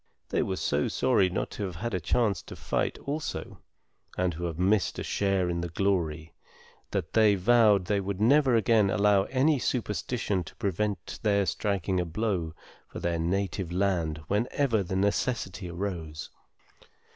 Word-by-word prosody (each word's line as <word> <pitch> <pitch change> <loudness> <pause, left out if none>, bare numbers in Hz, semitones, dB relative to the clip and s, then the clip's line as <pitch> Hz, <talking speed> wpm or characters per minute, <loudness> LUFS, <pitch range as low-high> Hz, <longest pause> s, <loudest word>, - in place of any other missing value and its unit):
They - - +1
were 95 - -1
so 75 -5 0
sorry 115 -8 +2
not 90 - -3
to 105 - -5
have 90 -3 -6
had 115 +6 -4
a 95 - 0
chance 100 +3 +1
to - - -10
fight - - -1
also, 150 +2 -4 0.6
and 90 -1 +1
to 85 +3 -4
have 85 -2 -4
missed 95 +3 +2
a - - -3
share 95 -2 0
in 85 -1 -1
the 85 - -3
glory, 85 -4 -1 0.6
that 80 - -3
they 110 -2 +5
vowed 105 -1 +4
they 100 +2 +1
would 100 0 -4
never 130 +3 +4
again 110 -3 +3
allow 100 -1 +3
any 140 +2 +2
superstition 105 -4 -1
to - - -12
prevent 100 -3 -2
their 100 -2 +2
striking 95 -2 -1
a 90 - 0
blow 85 -3 -2 0.3
for - - -8
their 85 -1 -1
native 95 +1 -1
land 90 -4 0
whenever 115 +3 +1
the 95 0 -4
necessity 100 -1 -1
arose. 85 -4 -5
100 Hz, 160 wpm, -28 LUFS, 85-110 Hz, 0.6 s, they